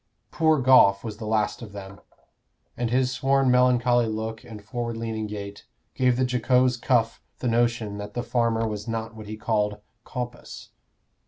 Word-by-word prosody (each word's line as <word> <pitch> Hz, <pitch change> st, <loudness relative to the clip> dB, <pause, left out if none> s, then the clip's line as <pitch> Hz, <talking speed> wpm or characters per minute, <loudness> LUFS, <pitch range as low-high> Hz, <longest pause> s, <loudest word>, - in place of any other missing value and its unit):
Poor 160 Hz, -2 st, +3 dB
Goffe 125 Hz, -7 st, +5 dB
was 110 Hz, -3 st, -6 dB
the 110 Hz, -1 st, -6 dB
last 110 Hz, 0 st, 0 dB
of 105 Hz, -4 st, -9 dB
them, 100 Hz, 0 st, -9 dB, 0.8 s
and 120 Hz, -1 st, -2 dB
his 125 Hz, 0 st, 0 dB
worn 135 Hz, -1 st, +3 dB
melancholy 125 Hz, -1 st, +3 dB
look 110 Hz, +1 st, -4 dB
and 105 Hz, -3 st, -11 dB
forward 115 Hz, +2 st, -4 dB
leaning 110 Hz, -1 st, -3 dB
gait 100 Hz, -1 st, -8 dB, 0.3 s
gave 125 Hz, -1 st, +2 dB
the 130 Hz, -, +2 dB
jocose 125 Hz, 0 st, +2 dB
Cuff 120 Hz, -2 st, 0 dB, 0.2 s
the 125 Hz, -, -3 dB
notion 115 Hz, -3 st, 0 dB
that 105 Hz, 0 st, -8 dB
the 120 Hz, -, -2 dB
farmer 115 Hz, -2 st, 0 dB
was 105 Hz, 0 st, -5 dB
not 115 Hz, 0 st, -4 dB
what 110 Hz, -1 st, -10 dB
he 110 Hz, +1 st, -6 dB
called 105 Hz, -2 st, -1 dB, 0.2 s
"compus." 125 Hz, -1 st, -7 dB
115 Hz, 165 wpm, -25 LUFS, 110-125 Hz, 0.8 s, Goffe